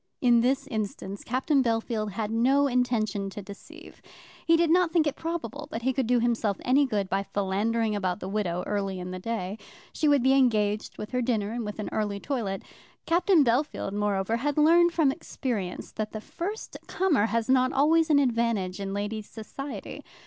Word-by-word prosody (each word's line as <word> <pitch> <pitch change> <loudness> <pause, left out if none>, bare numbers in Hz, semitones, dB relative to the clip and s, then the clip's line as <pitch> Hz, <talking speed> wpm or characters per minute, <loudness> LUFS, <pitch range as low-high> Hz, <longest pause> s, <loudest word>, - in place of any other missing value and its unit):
In 240 -2 +4
this 270 +3 +1
instance 205 -5 -4
Captain 270 +2 +1
Bellfield 225 -3 -1
had 215 +1 -3
no 265 +5 +3
intention 235 -6 0
to 205 - -7
deceive. 200 +1 -12 0.5
He 330 0 +6
did 335 -1 +2
not 355 -1 +4
think 330 -2 +3
it 295 -2 -1
probable 330 -8 -5
that 225 - -5
he 265 +1 +1
could 260 -2 -1
do 245 0 +3
himself 230 -4 0
any 275 +3 +4
good 205 -5 -1
by 195 +1 0
philandering 210 +3 -1
about 185 -2 -1
the 185 - -6
widow 190 -3 -1
early 195 -2 -2
in 180 0 -6
the 185 - -5
day. 210 -1 -4 0.3
She 310 - 0
would 285 -4 +4
be 265 +1 +5
engaged 215 -6 +1
with 210 - -7
her 250 -1 0
dinner 220 -4 0
and 235 0 -3
with 210 - -5
an 210 - -4
early 205 -2 -2
toilet. 205 -7 -3 0.4
Captain 345 -1 +4
Bellfield, 245 -3 0
moreover, 205 +1 0
had 290 +4 -2
learned 340 +3 +5
from 315 -5 +3
experience 235 - -4
that 215 -1 -4
the 215 - -4
first 385 - -6
comer 315 - +2
has 230 0 -1
not 255 0 +3
always 315 +4 +3
an 300 - +5
advantage 230 -8 +1
in 195 0 -4
ladies' 205 +1 -4
society. 275 +5 -7
230 Hz, 185 wpm, -27 LUFS, 205-275 Hz, 0.5 s, He